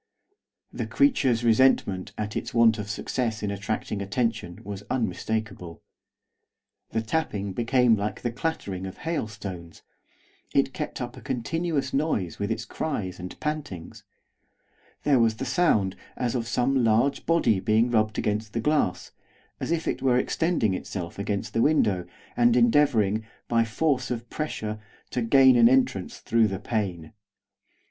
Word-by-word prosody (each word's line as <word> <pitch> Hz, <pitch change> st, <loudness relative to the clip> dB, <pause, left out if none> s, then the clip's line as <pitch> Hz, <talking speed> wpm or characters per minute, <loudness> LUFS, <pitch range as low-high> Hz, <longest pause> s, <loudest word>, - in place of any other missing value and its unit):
The -, -, -3 dB
creature's 135 Hz, -, +2 dB
resentment 115 Hz, -5 st, +3 dB
at 105 Hz, 0 st, -4 dB
its -, -, -4 dB
want 115 Hz, -1 st, +5 dB
of 105 Hz, 0 st, -5 dB
success 110 Hz, +1 st, -2 dB
in 100 Hz, -, -1 dB
attracting 100 Hz, 0 st, -3 dB
attention 105 Hz, -4 st, -2 dB
was 100 Hz, 0 st, -6 dB
unmistakable. 110 Hz, -7 st, -3 dB, 1.1 s
The 110 Hz, 0 st, -1 dB
tapping 105 Hz, -7 st, -2 dB
became 120 Hz, +2 st, +3 dB
like 105 Hz, 0 st, -4 dB
the 120 Hz, -, 0 dB
clattering 100 Hz, -, -3 dB
of 95 Hz, -, -9 dB
hailstones; 105 Hz, -, -5 dB, 0.7 s
it 135 Hz, -1 st, +2 dB
kept 150 Hz, -3 st, -5 dB
up 120 Hz, 0 st, -5 dB
a -, -, -10 dB
continuous 140 Hz, +3 st, -2 dB
noise 135 Hz, -, -1 dB
with 100 Hz, 0 st, -1 dB
its 115 Hz, 0 st, -2 dB
cries 100 Hz, -, -4 dB
and 90 Hz, +1 st, -8 dB
pantings; 150 Hz, -, -5 dB, 1.0 s
there 140 Hz, -3 st, +4 dB
was 115 Hz, -1 st, +3 dB
the -, -, -4 dB
sound 105 Hz, -, +2 dB, 0.2 s
as 120 Hz, -2 st, -1 dB
of 120 Hz, -3 st, -2 dB
some 130 Hz, +1 st, +1 dB
large 115 Hz, +5 st, +2 dB
body 140 Hz, -, +3 dB
being 110 Hz, +5 st, +2 dB
rubbed 110 Hz, -2 st, +1 dB
against 105 Hz, +1 st, -1 dB
the 115 Hz, -, -1 dB
glass, 145 Hz, -6 st, 0 dB, 0.5 s
as -, -, -4 dB
if 165 Hz, -1 st, -1 dB
it -, -, -1 dB
were 130 Hz, -2 st, +3 dB
extending 155 Hz, -, +1 dB
itself 90 Hz, -1 st, -5 dB
against 100 Hz, 0 st, -3 dB
the 115 Hz, -, +2 dB
window, 105 Hz, -, +2 dB, 0.3 s
and 120 Hz, 0 st, +4 dB
endeavouring, 115 Hz, -4 st, +3 dB, 0.2 s
by 115 Hz, -1 st, +3 dB
force 130 Hz, +3 st, 0 dB
of 120 Hz, -1 st, -4 dB
pressure, 110 Hz, -8 st, -3 dB, 0.3 s
to 125 Hz, -, -1 dB
gain 130 Hz, +2 st, +6 dB
an 115 Hz, -1 st, +7 dB
entrance 125 Hz, -8 st, +1 dB
through 115 Hz, -1 st, +2 dB
the 95 Hz, -2 st, -3 dB
pane. 100 Hz, -4 st, -3 dB
115 Hz, 145 wpm, -26 LUFS, 105-130 Hz, 1.1 s, an